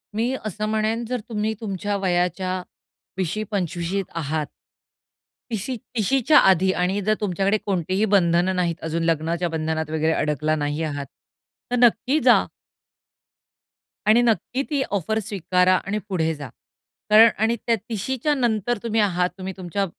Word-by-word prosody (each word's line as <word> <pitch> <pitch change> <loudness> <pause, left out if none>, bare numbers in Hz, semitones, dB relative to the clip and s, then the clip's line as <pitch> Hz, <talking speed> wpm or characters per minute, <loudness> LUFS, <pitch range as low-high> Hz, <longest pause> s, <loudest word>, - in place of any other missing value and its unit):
मी 235 +4 0
असं 215 0 -3
म्हणेन 220 +2 0
जर 250 +2 -2
तुम्ही 215 -1 -1
तुमच्या 205 -1 -3
वयाच्या 185 0 0 0.6
20शी-25शी 190 -1 -2
त - - -20
आहात. 155 -1 -2 1.0
30शी- 225 +4 -3 0.2
30 225 +4 +2
च्या 310 - +7
आधी 190 +1 +2
आणि 190 +3 0
जर 215 +2 +2
तुमच्याकडे 200 +1 +1
कोणतीही 190 +1 0
बंधन 175 -1 +3
नाहीत 175 -2 0
अजून 165 +1 -2
लग्नाच्या 165 +2 0
बंधनात 160 -1 -2
वगैरे 160 0 +1
अडकला 155 0 0
नाही 145 +1 -2
आहात, 145 -2 -3 0.7
तर - - +2
नक्की 255 +5 +3
जा - - +6 1.6
आणि 220 +3 +6
नक्की 240 +3 0
ती 290 -3 0 0.2
ऑफर 220 +4 -1
स्वीकारा 185 -3 +1
आणि 200 +3 -3
पुढे 160 -4 0
जा. 145 -3 -8 0.6
कारण 220 +2 +8
आणि 225 +2 +2
त्या 230 - +4
30शी 230 +4 -2
च्या 300 - +3
नंतर 240 -2 0
तुम्ही 225 -1 0
आहात 180 -3 +1
तुम्ही 190 0 -5
तुमच्या 190 +2 -2
190 Hz, 145 wpm, -23 LUFS, 170-220 Hz, 1.6 s, कारण